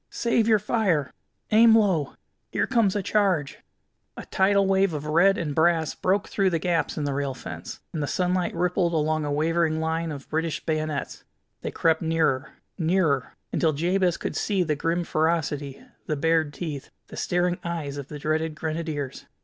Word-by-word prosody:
Save 235 Hz, -1 st, +1 dB
your 220 Hz, -2 st, +5 dB
fire! 195 Hz, -, 0 dB, 0.4 s
Aim 225 Hz, +1 st, +7 dB
low! 185 Hz, -10 st, +1 dB, 0.4 s
Here -, -, +1 dB
comes 230 Hz, -7 st, +2 dB
a 205 Hz, -, -1 dB
charge!" 190 Hz, -8 st, +1 dB, 0.6 s
A -, -, -7 dB
tidal 195 Hz, +1 st, +3 dB
wave 195 Hz, -2 st, +2 dB
of 150 Hz, 0 st, -5 dB
red 175 Hz, +6 st, +4 dB
and 150 Hz, -4 st, -2 dB
brass 160 Hz, 0 st, +2 dB
broke 195 Hz, +2 st, 0 dB
through 195 Hz, -2 st, +1 dB
the 170 Hz, -, 0 dB
gaps 170 Hz, 0 st, -1 dB
in 150 Hz, -, -1 dB
the 145 Hz, -1 st, -1 dB
rail 140 Hz, -1 st, -2 dB
fence, -, -, -8 dB
and 155 Hz, -, -2 dB
the 145 Hz, -, -1 dB
sunlight 180 Hz, +1 st, 0 dB
rippled 175 Hz, 0 st, +1 dB
along 155 Hz, 0 st, +1 dB
a 145 Hz, -, -2 dB
wavering 160 Hz, +1 st, +1 dB
line 160 Hz, 0 st, -1 dB
of 140 Hz, -2 st, -8 dB
British 160 Hz, 0 st, -2 dB
bayonets. 155 Hz, -2 st, -2 dB, 0.4 s
They -, -, -3 dB
crept 160 Hz, -1 st, +1 dB
nearer, 160 Hz, -4 st, 0 dB, 0.3 s
nearer, 160 Hz, -5 st, +1 dB, 0.2 s
until 160 Hz, -2 st, +2 dB
Jabez 175 Hz, +3 st, +1 dB
could -, -, -4 dB
see 195 Hz, -4 st, +1 dB
the 155 Hz, -3 st, 0 dB
grim 165 Hz, +4 st, 0 dB
ferocity, 150 Hz, -4 st, -1 dB, 0.2 s
the 155 Hz, -, 0 dB
bared 160 Hz, 0 st, +2 dB
teeth, 145 Hz, -3 st, -6 dB, 0.2 s
the -, -, -9 dB
staring 175 Hz, 0 st, 0 dB
eyes 160 Hz, -5 st, -4 dB
of 140 Hz, -2 st, -6 dB
the 150 Hz, -, -7 dB
dreaded 155 Hz, +1 st, -1 dB
Grenadiers. 155 Hz, -3 st, -4 dB
165 Hz, 175 wpm, -25 LUFS, 150-185 Hz, 0.6 s, Aim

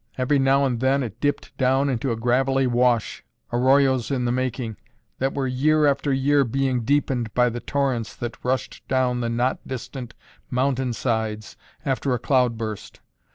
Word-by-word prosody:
Every 130 Hz, +2 st, +2 dB
now 135 Hz, +1 st, +3 dB
and 125 Hz, -3 st, -1 dB
then 135 Hz, +2 st, +2 dB
it 115 Hz, -1 st, -7 dB
dipped 145 Hz, 0 st, -1 dB
down 135 Hz, +2 st, +3 dB
into 130 Hz, -1 st, -1 dB
a -, -, 0 dB
gravelly 130 Hz, +3 st, +1 dB
wash, 120 Hz, -2 st, +1 dB, 0.3 s
arroyos 130 Hz, 0 st, +3 dB
in 130 Hz, -3 st, -1 dB
the 120 Hz, -, +1 dB
making, 125 Hz, -3 st, -2 dB, 0.4 s
that 135 Hz, +1 st, -1 dB
were, 140 Hz, -1 st, -1 dB
year 150 Hz, +4 st, +2 dB
after 140 Hz, 0 st, +1 dB
year, 140 Hz, +2 st, +3 dB
being 130 Hz, 0 st, 0 dB
deepened 130 Hz, -3 st, 0 dB
by 125 Hz, 0 st, +4 dB
the 120 Hz, +1 st, -5 dB
torrents 130 Hz, -4 st, -1 dB
that 120 Hz, -1 st, -6 dB
rushed 130 Hz, +1 st, -2 dB
down 125 Hz, -2 st, +1 dB
the 115 Hz, -, -1 dB
not 120 Hz, +3 st, 0 dB
distant 130 Hz, -1 st, -7 dB, 0.3 s
mountain 130 Hz, -1 st, 0 dB
sides 110 Hz, -3 st, -2 dB, 0.3 s
after 135 Hz, -1 st, 0 dB
a -, -, -1 dB
cloudburst. 115 Hz, -5 st, -1 dB
130 Hz, 160 wpm, -23 LUFS, 120-135 Hz, 0.4 s, by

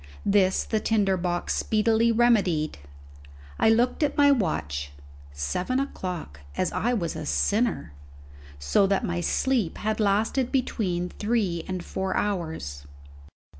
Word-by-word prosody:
This 195 Hz, -2 st, +3 dB
the 220 Hz, -, -1 dB
tinder 205 Hz, -3 st, +2 dB
box 175 Hz, -1 st, -1 dB
speedily 225 Hz, +1 st, +2 dB
remedied. 200 Hz, -, +2 dB, 0.8 s
I -, -, +5 dB
looked 240 Hz, +5 st, +2 dB
at 295 Hz, -2 st, 0 dB
my 285 Hz, -1 st, +6 dB
watch 75 Hz, -, -1 dB, 0.4 s
seven 75 Hz, -, -2 dB
o'clock, 180 Hz, -, -5 dB, 0.2 s
as 185 Hz, -, 0 dB
I 240 Hz, -, 0 dB
was 180 Hz, -9 st, -1 dB
a -, -, -5 dB
sinner! 205 Hz, -, 0 dB, 0.6 s
so 70 Hz, -, +2 dB
that 195 Hz, +3 st, +1 dB
my 175 Hz, -3 st, -2 dB
sleep 230 Hz, 0 st, 0 dB
had 215 Hz, +1 st, -2 dB
lasted 220 Hz, +5 st, +1 dB
between 185 Hz, -9 st, -1 dB
three 205 Hz, -7 st, -1 dB
and 185 Hz, -2 st, -4 dB
four 190 Hz, 0 st, -2 dB
hours. 160 Hz, -, -3 dB
195 Hz, 130 wpm, -26 LUFS, 170-225 Hz, 0.8 s, my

